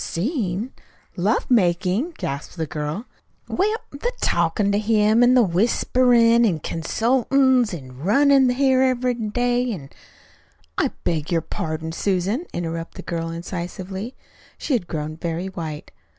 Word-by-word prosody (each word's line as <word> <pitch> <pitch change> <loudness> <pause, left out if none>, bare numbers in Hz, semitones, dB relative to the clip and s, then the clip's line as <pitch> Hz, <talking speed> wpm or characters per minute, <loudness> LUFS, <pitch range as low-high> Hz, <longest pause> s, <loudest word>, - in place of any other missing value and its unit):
"Seen! 215 - -2 0.4
Love 205 +8 0
making!" 195 - +2
gasped 140 +5 -5
the 160 - -1
girl. 150 +8 -4 0.4
"Well, 425 +4 0
the 285 +13 -3
talkin' 200 -2 +1
to 200 - +2
him, 215 0 +3
then, 245 +1 +5
an' 220 -8 +3
whisperin', 235 +4 +4
an' 175 -9 +1
consultin's, 250 - +2
an' 130 -7 -8
runnin' 270 - +4
here 260 +1 +3
every 255 -1 +2
day, 245 +2 0
an' 145 -10 -7 0.4
" 80 +1 -35
"I - - +3 0.2
beg 160 -2 -1
your 165 -1 +2
pardon, 160 0 -4
Susan," 200 - -1
interrupted 165 +2 -5
the - - -7
girl 165 -1 -2
incisively. 185 +6 -6 0.4
She 295 - -2
had 220 -9 0
grown 155 -1 -4
very 170 +2 -3
white. 160 -5 -6
200 Hz, 135 wpm, -22 LUFS, 165-245 Hz, 0.4 s, then